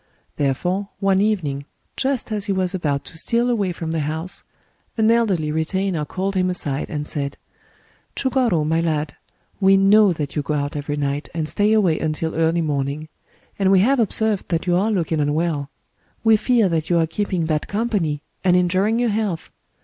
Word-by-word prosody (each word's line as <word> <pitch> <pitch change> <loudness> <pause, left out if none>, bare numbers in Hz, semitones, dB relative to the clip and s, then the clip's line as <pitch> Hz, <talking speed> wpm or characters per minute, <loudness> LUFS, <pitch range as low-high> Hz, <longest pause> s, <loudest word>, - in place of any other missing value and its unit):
Therefore, 180 +8 -1
one 195 -1 +2
evening, 155 -10 -1 0.3
just 265 -4 -1
as 210 -2 -1
he - - -1
was 190 -1 0
about 145 -6 -1
to 160 - -8
steal 235 +6 +1
away 205 -6 0
from 165 -2 -5
the 165 - -1
house, 160 +4 -4 0.5
an 220 0 +4
elderly 195 -10 +1
retainer 165 +1 -1
called 190 +5 -3
him 185 -1 +1
aside, 145 -6 -2
and 150 -1 -3
said: 140 -2 -4 0.4
— - - -36
"ChugorS, 250 - +1
my 160 +2 +1
lad, 155 -3 -1 0.4
we 195 -1 +5
know 200 +1 +5
that 150 -4 -4
you 150 - +1
go 150 +1 -2
out 145 0 -2
every 145 0 -3
night 145 0 -2
and 160 -2 -1
stay 205 +6 +1
away 190 -8 +3
until 160 +1 -2
early 165 +1 +1
morning; 145 +1 -2 0.5
and 195 -1 +3
we 190 -1 +6
have 265 +6 +3
observed 220 -2 +1
that 170 0 -1
you 175 -1 +2
are 200 +5 +2
looking 170 -6 0
un 145 0 +1
well. 155 -4 -1 0.5
We 225 -1 +6
fear 230 -1 +3
that 165 -3 -1
you 175 - +3
are 165 - +3
keeping 180 0 -2
bad 155 -1 -1
company, 200 -9 -1 0.2
and 180 -1 +4
injuring 185 +5 +2
your 240 -1 +1
health. 205 -5 -2
175 Hz, 190 wpm, -21 LUFS, 155-205 Hz, 0.5 s, we